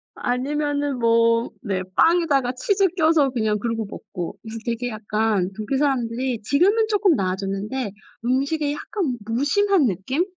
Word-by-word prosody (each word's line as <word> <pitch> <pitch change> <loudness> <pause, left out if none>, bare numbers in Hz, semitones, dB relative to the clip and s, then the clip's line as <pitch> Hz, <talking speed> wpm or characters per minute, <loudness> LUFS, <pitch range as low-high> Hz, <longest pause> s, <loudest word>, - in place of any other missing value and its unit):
아니면은 285 +2 -1
뭐 230 0 +3
네 195 -4 -2
빵에다가 315 -7 +3
치즈 390 +10 +1
껴서 315 -4 +4
그냥 220 -4 0
그러고 225 +1 -2
먹고 195 -2 -7
그래서 225 0 -7
되게 235 +1 -2
약간 210 -3 0
독일 220 +5 -2
사람들이 250 -3 0
지금은 385 - +3
쪼끔 410 -5 +3
나아졌는데 195 +5 -2 0.3
음식에 280 +4 0
약간 295 - -3
무심한 290 - +2
느낌? 220 - -1
250 Hz, 310 characters per minute, -23 LUFS, 220-295 Hz, 0.3 s, 껴서